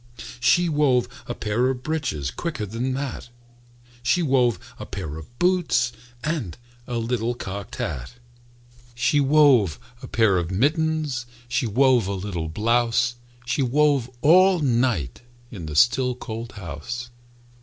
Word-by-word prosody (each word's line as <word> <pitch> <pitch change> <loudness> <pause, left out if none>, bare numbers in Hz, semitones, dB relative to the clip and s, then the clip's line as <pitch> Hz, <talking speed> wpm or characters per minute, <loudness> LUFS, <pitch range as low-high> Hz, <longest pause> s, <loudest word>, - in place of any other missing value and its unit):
She 175 +9 +4
wove 140 -6 +2 0.2
a 120 - -4
pair 115 +4 0
of 130 -1 -3
breeches 130 - -2
Quicker 150 -11 -4
than 120 +5 -3
that! 135 -3 -5 0.7
She 170 +9 +2
wove 130 -5 +3 0.2
a - - -6
pair 80 -7 -5
of 80 +10 -12
boots 175 -9 +2 0.3
And 150 - -3 0.3
a 120 - -3
little 115 0 -1
cocked 100 -3 -6
hat. 65 - -4 0.8
She 125 +5 +2
wove 135 - +4 0.2
a - - -8
pair 105 -5 +3
of 85 -1 -3
mittens, 145 - 0 0.2
She 120 0 0
wove 125 -1 +3
a 100 - -2
little 90 -4 -4
blouse, 120 +5 +1 0.3
She 130 +3 0
wove 140 -1 +2
all 185 +6 +6
night 120 - 0 0.3
In 90 -9 -7
the 75 - -6
still, 125 - +3
cold 115 -1 -7
house. 105 +6 -6
120 Hz, 135 wpm, -24 LUFS, 105-140 Hz, 0.8 s, all